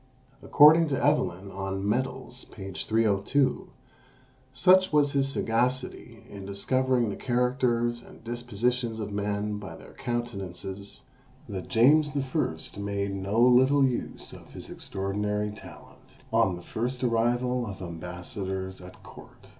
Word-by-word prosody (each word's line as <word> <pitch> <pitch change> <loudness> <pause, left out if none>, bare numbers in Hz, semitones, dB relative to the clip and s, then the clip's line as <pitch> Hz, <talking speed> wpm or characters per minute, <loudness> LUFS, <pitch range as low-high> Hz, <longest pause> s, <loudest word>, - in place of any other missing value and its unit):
According 160 +3 +7
to 140 -3 -1
Evelyn 100 - +1
on 95 0 -3
Medals, 130 +2 -2
p. 95 -1 -9
302, 110 +6 +1 0.8
such 185 +8 +5
was 145 -2 +3
his 140 -1 +2
sagacity 120 -2 -1
in 100 -1 -9
discovering 120 +4 0
the - - -4
characters 120 -1 0
and - - -16
dispositions 120 0 -2
of 105 -1 -4
men 105 +1 -2
by 95 -5 -8
their - - -14
countenances, 100 -5 -5 0.4
that 95 -3 -6
James 145 +5 +4
I. 130 - -2
made 100 -1 -2
no 100 +3 -1
little 130 +3 +5
use 125 -2 -3
of - - -13
his - - -9
extraordinary 105 +2 -2
talent 105 - -13 0.3
on 95 -2 +3
the 85 - -10
first 125 +6 -3
arrival 120 +1 +1
of 100 -2 -7
ambassadors 95 +2 -5
at 90 0 -13
court. - - -15
115 Hz, 125 wpm, -27 LUFS, 100-125 Hz, 0.8 s, According